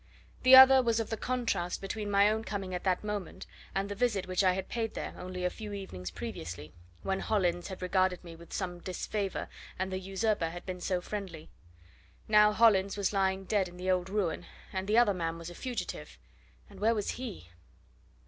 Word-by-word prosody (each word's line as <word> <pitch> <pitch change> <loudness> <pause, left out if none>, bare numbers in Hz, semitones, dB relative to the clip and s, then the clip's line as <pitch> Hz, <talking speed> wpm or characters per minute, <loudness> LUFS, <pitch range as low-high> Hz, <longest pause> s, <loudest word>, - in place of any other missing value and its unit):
The 260 0 +9
other 265 0 +10
was 230 -2 +1
of 225 - -3
the - - +1
contrast 230 -7 -1
between 205 +2 -4
my 200 0 +5
own 220 +1 0
coming 195 -4 -4
at 180 - -3
that 185 0 +1
moment 210 -4 -5 0.3
and 195 +1 0
the 205 - -4
visit 205 -3 0
which 185 +1 0
I 185 -1 +4
had 190 0 -4
paid 225 -2 -3
there, - - -4
only 180 0 -5
a - - +3
few 210 -2 -7
evenings 95 - -6
previously, 80 -1 -7 0.3
when 195 0 -1
Hollins 175 -5 0
had 190 -1 -7
regarded 185 0 +1
me 170 -2 -10
with 170 +1 -15
some 175 -2 -3
disfavour 190 +2 -3 0.3
and 190 +1 -2
the 185 - -1
usurper 195 -2 0
had 175 +1 -8
been 180 -1 -5
so 180 0 0
friendly. 180 -5 -6 0.8
Now 210 0 +6
Hollins 205 -3 +4
was 200 0 0
lying 190 -1 +1
dead 195 -1 +1
in 175 0 -12
the 185 +1 0
old 180 0 0
ruin, 195 -4 -1 0.3
and 190 0 -3
the 215 +2 +3
other 235 -4 +5
man 165 -2 -2
was 170 +1 -8
a - - -9
fugitive 245 +6 -5 0.5
and - - -14
where 225 +2 +3
was 210 - -2
he? 220 - -7
190 Hz, 200 wpm, -31 LUFS, 180-210 Hz, 0.8 s, other